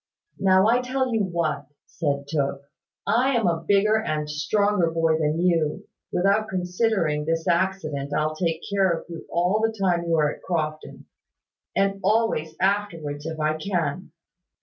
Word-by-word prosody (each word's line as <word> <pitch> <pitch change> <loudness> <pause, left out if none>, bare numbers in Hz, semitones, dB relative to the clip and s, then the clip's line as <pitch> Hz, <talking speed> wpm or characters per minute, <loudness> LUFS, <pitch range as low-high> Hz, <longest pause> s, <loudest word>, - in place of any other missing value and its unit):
"Now, 190 0 +4
I'll 240 +2 +3
tell 255 0 -1
you 225 - +2
what," 170 -6 -1 0.2
said 140 -3 -2
Tooke. 140 -2 -1 0.4
"I 255 +3 +2
am 230 -3 +1
a 165 -2 0
bigger 205 +2 +4
and 155 -6 -2
stronger 180 +4 +1
boy 165 -1 +1
than 155 +1 0
you, 170 -4 +1 0.2
without 200 +4 +2
considering 180 -4 0
this 165 0 -1
accident 170 -6 0
I'll 155 +1 0
take 165 0 -1
care 195 -2 +2
of 170 -1 -2
you 165 -1 -8
all 180 +5 +1
the 225 0 0
time 175 -3 +1
you 165 -1 +1
are 150 -2 +2
at - - -14
Crofton: 155 -3 -4 0.7
and 195 0 +1
always 200 -7 +1
afterwards, 165 -7 -1
if 160 -1 -5
I 155 0 0
can. 175 -1 -2
170 Hz, 155 wpm, -24 LUFS, 155-200 Hz, 0.7 s, Now